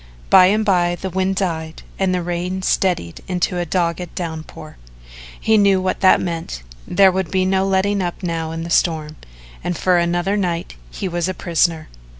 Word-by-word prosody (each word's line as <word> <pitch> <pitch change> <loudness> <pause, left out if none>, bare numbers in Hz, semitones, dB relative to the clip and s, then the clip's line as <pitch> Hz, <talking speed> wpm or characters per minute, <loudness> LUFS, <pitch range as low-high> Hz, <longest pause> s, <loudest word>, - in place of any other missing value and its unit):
By 180 - +8
and 215 +3 +1
by 175 -3 +2
the 190 - -4
wind 190 +1 0
died 165 -4 -3 0.2
and 190 -1 +1
the 180 -1 -1
rain 175 +2 -3
steadied 175 - 0
into 180 -1 -1
a 175 - -2
dogged 170 0 -2
downpour. 160 - -7 0.6
He 220 -1 +3
knew 200 -2 +4
what 185 0 -1
that 190 - +5
meant 165 - -4 0.2
there 195 -1 +5
would 190 -1 -2
be 185 -1 +1
no 190 0 +1
letting 195 +1 +1
up 175 +1 -4
now 165 -2 -2
in 165 0 -5
the 170 - -6
storm, 155 -3 0 0.5
and 175 -1 -2
for 180 -1 +3
another 175 +3 0
night 175 -4 -2 0.2
he 190 - -5
was 175 0 -2
a 185 - -3
prisoner. 170 -2 0
180 Hz, 180 wpm, -19 LUFS, 170-190 Hz, 0.6 s, By